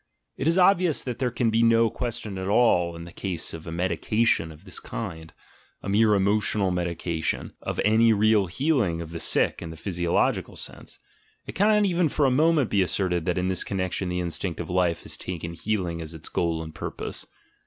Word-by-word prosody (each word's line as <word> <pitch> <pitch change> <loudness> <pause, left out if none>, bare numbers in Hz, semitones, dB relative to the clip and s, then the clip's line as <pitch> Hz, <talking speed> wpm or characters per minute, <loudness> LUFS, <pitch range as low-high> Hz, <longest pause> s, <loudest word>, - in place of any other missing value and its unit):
It 135 - -2
is 165 +2 +3
obvious 180 -3 +4
that 125 -3 -5
there 125 - +1
can 120 -1 0
be 115 +1 +2
no 115 -1 +4
question 110 -5 -4
at 95 - -4
all 95 -6 +3
in 85 - -8
the 85 - -10
case 90 -4 -4
of 80 0 -8
a - - -5
"medication" 90 +1 +1
of 75 - -15
this - - -6
kind, 80 -7 -6 0.5
a - - -4
mere 105 +1 +4
emotional 100 0 +1
medication, 85 -2 -2
of - - -4
any 110 +2 +5
real 105 -2 +3
healing 115 - 0
of 85 -1 -7
the 85 - -5
sick - - +1
in 85 - -6
the 80 - -9
physio 85 0 -3
logical - - +1
sense; - - -8 0.5
it - - -7
cannot 210 +1 +3
even 175 -4 +2
for 145 0 +1
a 130 - +3
moment 150 -1 +3
be 100 - +3
asserted 90 -1 0
that 90 -1 0
in 90 0 0
this 95 -1 0
connection 95 -1 -2
the 90 0 -1
instinct 85 0 -3
of 85 0 -5
life 90 -2 +1
has - - -6
taken 85 -2 -5
heal 100 +2 -1
ing 85 -1 -4
as 80 0 -6
its 80 - -7
goal 85 -2 -1
and 80 -1 -9
purpose. - - -6
95 Hz, 205 wpm, -25 LUFS, 85-115 Hz, 0.5 s, any